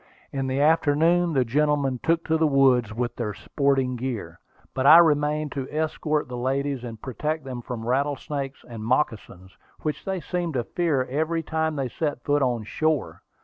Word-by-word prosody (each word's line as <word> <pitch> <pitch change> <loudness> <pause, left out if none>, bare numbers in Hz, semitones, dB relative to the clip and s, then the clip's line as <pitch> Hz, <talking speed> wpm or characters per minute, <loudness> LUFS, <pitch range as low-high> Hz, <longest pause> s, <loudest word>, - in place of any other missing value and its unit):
In 135 -1 -2
the 130 +1 -1
afternoon 165 +3 +3
the 130 -3 +2
gentlemen 140 0 +1
took 165 0 +1
to 160 - +1
the 160 0 +3
woods 130 -5 +3
with 120 +2 -3
their 105 -4 -3
sporting 135 +3 0
gear, 115 -9 -5 0.3
but 130 +1 +1
I 160 - +10
remained 150 -2 +3
to 135 -2 -4
escort 155 -1 -1
the 125 - -6
ladies 135 +1 -1
and 115 -2 -7
protect 150 +6 -3
them 130 -2 -6
from 115 -2 -6
rattlesnakes 140 +1 -2
and 115 -3 -8
moccasins, 110 -7 -2 0.3
which 155 -1 -3
they 190 -1 -2
seemed 175 -2 -3
to 120 - 0
fear 155 -2 0
every 160 +5 -1
time 160 0 -1
they 135 -2 -1
set 145 -2 -3
foot 145 0 +1
on 120 -4 0
shore. 155 +5 -1
140 Hz, 175 wpm, -25 LUFS, 125-155 Hz, 0.3 s, I